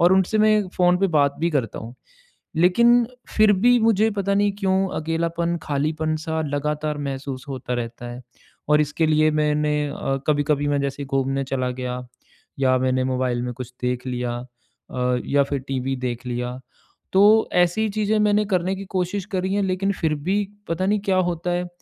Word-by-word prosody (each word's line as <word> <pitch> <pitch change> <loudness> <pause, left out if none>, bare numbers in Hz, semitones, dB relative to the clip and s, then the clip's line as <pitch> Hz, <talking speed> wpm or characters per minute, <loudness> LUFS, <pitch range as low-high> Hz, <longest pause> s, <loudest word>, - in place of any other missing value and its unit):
और 175 +2 +5
उनसे 190 +3 +2
मैं 215 -2 +3
फ़ोन 180 0 +4
पे 195 - +3
बात 140 -1 +3
भी 170 +1 +1
करता 130 -8 -1
हूँ। 115 +2 -9 0.6
लेकिन 235 +8 +5 0.2
फिर 215 -1 +4
भी 240 +5 +4
मुझे 220 -1 +3
पता 200 0 0
नहीं 205 0 +3
क्यों 190 -1 +1
अकेलापन 170 +2 -1
खालीपन 155 +2 -1
सा 160 +1 -3
लगातार 150 +1 -2
महसूस 135 -2 -5
होता 130 -2 -4
रहता 120 0 -5
है 120 +1 -8 0.5
और 150 0 +5
इसके 150 +2 0
लिए 155 0 +3
मैंने 150 0 +1 0.2
अ, 135 -1 -2
कभी-कभी 145 -1 +1
मैं 145 -1 +1
जैसे 140 +1 -3
घूमने 135 0 -1
चला 130 -1 -2
गया 125 0 -4 0.6
या 130 -1 +3
मैंने 130 0 +1
मोबाइल 125 -2 -1
में 125 0 -3
कुछ 125 0 -8
देख 125 +1 -2
लिया 125 -1 -2 0.6
अ, 125 0 0
या 140 0 +3
फिर 140 0 -2
टीवी 135 0 -2
देख 120 +1 -4
लिया 125 0 -3 0.6
तो 210 +3 +6
ऐसी 180 +5 +2
चीज़ें 215 +1 0
मैंने 210 0 +3
करने 185 -1 0
की 195 - -7
कोशिश 185 +2 -1
करी 190 0 -1
हैं 205 - +1
लेकिन 190 +1 0
फिर 160 -2 +1
भी 190 +8 -1 0.2
पता 170 +3 -1
नहीं 205 +1 +2
क्या 195 -2 0
होता 175 -1 0
है। 175 0 -1
155 Hz, 180 wpm, -23 LUFS, 135-190 Hz, 0.6 s, तो